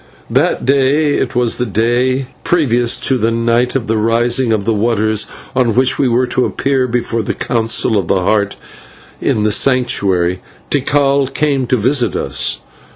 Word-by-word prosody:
That - - +1
day 140 +3 +2
it 125 - -2
was 120 -2 0
the 125 - -1
day 120 +5 0 0.2
previous 120 -8 +1
to 130 -2 0
the 110 +1 +1
night 115 +2 0
of 130 -4 -1
the 110 -1 -1
Rising 120 +2 +1
of 105 -2 -1
Waters, 110 -1 0 0.3
on 125 -4 +1
which 130 +1 +2
we 135 - +2
were 125 +1 +1
to 125 +1 -1
appear 135 -1 0
before 115 -1 -2
the 105 - -4
Council 115 -1 0
of 90 - -4
the 95 - +1
Heart 100 +1 0 0.7
in 105 - 0
the 105 - +1
Sanctuary 100 -9 +1 0.3
Tikal 140 0 +1
came 140 -3 -1
to 125 - +1
visit 125 +3 +1
us. - - -2
120 Hz, 160 wpm, -15 LUFS, 110-130 Hz, 0.7 s, day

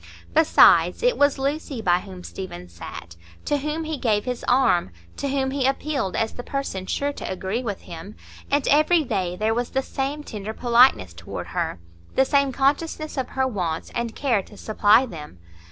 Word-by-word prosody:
Besides, 320 +7 +5
it - - +3
was 285 -1 +3
Lucy 275 -1 -2
by 180 -4 +2
whom 185 -2 -10
Stephen 90 - -7
sat, 85 0 -9 0.3
to 290 - +1
whom 300 +3 -3
he 310 -2 -4
gave 210 -4 +1
his 250 -1 -3
arm, 245 - +3 0.3
to 280 - -2
whom 265 -1 0
he 270 -1 +1
appealed 270 -7 -1
as 225 0 -1
the - - -6
person 245 -9 -4
sure 285 0 -1
to - - -6
agree 190 +5 -2
with 210 -6 -4
him; 170 +5 -9 0.3
and 285 0 +1
every 310 +3 +4
day 190 -8 -2
there 215 +4 0
was 240 +1 -1
the 265 0 -1
same 275 +3 -3
tender 215 -4 -6
politeness 235 - +4
toward 85 0 -7
her, - - -2 0.4
the 265 - +4
same 280 -1 +2
consciousness 295 +4 0
of 260 -3 -2
her 265 0 0
wants 175 -9 -3
and 235 -1 -3
care 245 -8 +1
to 205 +2 -16
supply 215 +3 +4
them. 155 - -10
245 Hz, 185 wpm, -23 LUFS, 195-280 Hz, 0.4 s, Besides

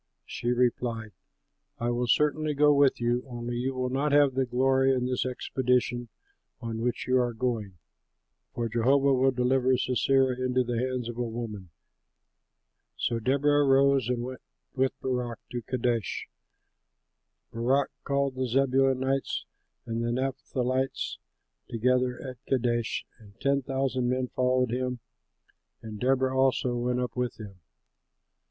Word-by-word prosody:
She 120 - -6
replied, 120 -2 0 0.7
"I 120 +1 -1
will 120 0 -1
certainly 150 +3 +2
go 150 +1 +5
with 140 -2 +4
you, 120 +1 0
only 120 -1 -4
you 130 +2 -2
will 125 0 -2
not 140 +3 0
have 145 -2 +5
the 130 0 0
glory 135 +2 +3
in 125 -1 -1
this 125 0 -1
expedition 125 -1 0 0.5
on 115 -2 -4
which 120 +1 -1
you 130 0 +3
are 120 -2 0
going, 110 -6 -2 0.7
for 115 - -2
Jehovah 135 +5 +3
will 130 +1 +4
deliver 130 0 +2
Sisera 130 +1 +2
into 130 0 +2
the 120 -1 -2
hands 125 -1 -2
of 120 0 -6
a 120 -1 -1
woman." 110 -5 -6 1.3
So 115 - -1
Deborah 145 +4 +3
arose 135 -2 +4
and 120 -1 -1
went 130 0 -7 0.3
with 130 0 0
Barak 125 -3 -2
to 120 -1 -3
Kadesh. 115 -2 -2 1.3
Barak 130 +4 +1
called 140 -1 0
the 130 0 -2
Zebulunites 135 +1 +1 0.4
and 115 +1 -2
the 120 - -1
Naphtalites 130 0 -2 0.5
together 125 +1 +1
at 130 0 -9
Kadesh 120 -2 0
and 105 0 -18
ten 140 0 +2
thousand 130 -1 -1
men 130 0 -1
followed 125 -1 +1
him; 125 0 -1 0.9
and 110 -2 -7
Deborah 130 0 +1
also 130 -2 +2
went 125 +1 0
up 125 -2 -3
with 125 -2 -2
him. 100 -4 -10
125 Hz, 140 wpm, -28 LUFS, 120-135 Hz, 1.3 s, go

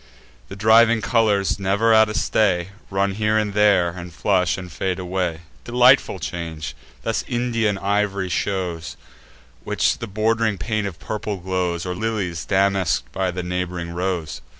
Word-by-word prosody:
The - - -8
driving 110 +3 +5
colours, 105 -4 +1
never 100 +4 +2
at 110 -1 +6
a 105 - -4
stay, 95 -6 +1 0.2
Run 100 0 0
here 110 +2 +1
and 105 -2 0
there, 105 -4 +4
and 90 0 -8
flush, 90 0 +1
and 90 -2 -8
fade 90 +2 -2
away. 90 -3 -2 0.2
Delightful 125 -2 +4
change! 80 -6 -5 0.3
Thus - - -1
Indian 115 -4 0
iv'ry 100 -1 -1
shows, 85 -9 -2 0.7
Which - - +1
with - - -5
the 115 - -5
bord'ring 110 +1 0
paint 110 +2 -2
of 90 -5 -7
purple 105 -1 -4
glows; 90 -2 -2
Or 90 - -2
lilies 95 -6 -3
damask'd 95 -10 +1
by 95 -1 -1
the 90 0 -4
neighb'ring 90 -1 -3
rose. 85 -5 -3
95 Hz, 150 wpm, -22 LUFS, 90-110 Hz, 0.7 s, at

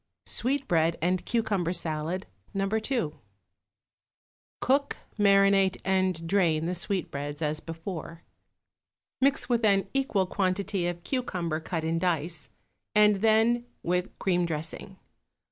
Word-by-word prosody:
=Sweetbread 205 - +1
and 180 +2 0
Cucumber 200 -7 0
Salad, 165 +1 -2 0.3
No. 195 0 +1
2.= 220 - -1 1.4
Cook, 280 +2 +1 0.2
marinate 195 -1 +4
and 185 -3 +1
drain 165 -4 +2
the 175 - -1
sweetbreads 155 -5 -2
as 150 0 0
before; 165 0 -7 1.0
mix 275 +2 +3
with 240 -2 +1
an 200 -2 +3
equal 265 -8 +1
quantity 185 -1 -1
of 175 -1 -4
cucumber 175 - -2
cut 165 0 -3
in 165 +1 0
dice, 165 -4 -1 0.5
and 210 -1 +6
then 225 +3 +3 0.2
with 180 +1 -1
cream 175 -2 +1
dressing. 160 +4 -4
185 Hz, 110 wpm, -28 LUFS, 165-210 Hz, 1.4 s, and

